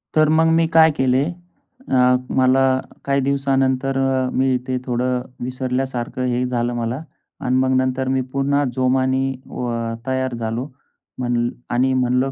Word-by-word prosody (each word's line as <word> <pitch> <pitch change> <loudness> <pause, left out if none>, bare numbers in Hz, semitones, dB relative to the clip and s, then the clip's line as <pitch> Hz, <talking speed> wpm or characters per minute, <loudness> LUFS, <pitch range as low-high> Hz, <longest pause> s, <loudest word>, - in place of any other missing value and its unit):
तर 155 -1 +4
मग 160 +1 +4
मी 165 0 +3
काय 160 0 +7
केले 130 +1 +2 0.6
अ, 125 -1 +4 0.2
मला 130 0 +4 0.4
काही 140 0 +2
दिवसानंतर 135 -1 +1
अ, 135 -1 +1
मी 130 -1 +2
ते 130 0 -1
थोडं 125 0 0 0.2
विसरल्यासारखं 130 -1 -2
हे 125 0 0
झालं 120 -1 -1
मला 120 +4 -2 0.4
आणि 125 - 0
मग 130 0 +2
नंतर 130 0 0
मी 130 0 +1
पुन्हा 140 +1 +1
जोमाने 130 +1 +1 0.3
व 125 -1 -3 0.4
तयार 130 -1 -1
झालो. 115 +3 -3 0.5
म्हण 120 -1 0 0.2
आणि 130 +2 +2
म्हणालो 130 +1 +1
130 Hz, 140 wpm, -20 LUFS, 125-135 Hz, 0.6 s, काय